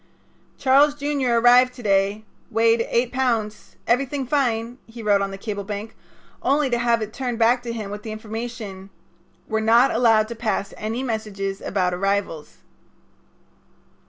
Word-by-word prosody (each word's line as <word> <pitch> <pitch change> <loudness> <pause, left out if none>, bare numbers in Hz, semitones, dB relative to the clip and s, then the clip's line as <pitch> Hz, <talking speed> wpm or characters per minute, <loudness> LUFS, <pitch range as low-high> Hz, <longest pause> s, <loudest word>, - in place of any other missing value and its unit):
"Charles 280 +2 +4
Jr. 285 -3 -1
arrived 245 +2 +5
to 245 - -11
day. 200 +1 +1 0.2
Weight 230 0 +2
eight 240 +1 +1
pounds. 230 -5 -2
Everything 270 +3 0
fine," 245 -3 -1
he 225 0 -10
wrote 205 -2 +3
on 195 - -1
the 195 - -7
cable 205 0 -5
blank, 210 +2 -6 0.5
only 280 -1 +1
to 240 - +1
have 235 -2 +2
it 215 0 -7
turned 245 -3 -3
back 235 +2 +3
to 240 -1 -5
him 215 -4 -5
with 205 0 -6
the 220 - -7
information: 215 -3 -7 0.6
"We're 220 - 0
not 230 +4 +4
allowed 225 -2 +3
to 235 - -5
pass 215 -3 -2
any 225 +4 -4
messages 205 -5 -4
about 185 -2 -1
arrivals." 195 -4 -2
225 Hz, 155 wpm, -22 LUFS, 210-245 Hz, 0.6 s, arrived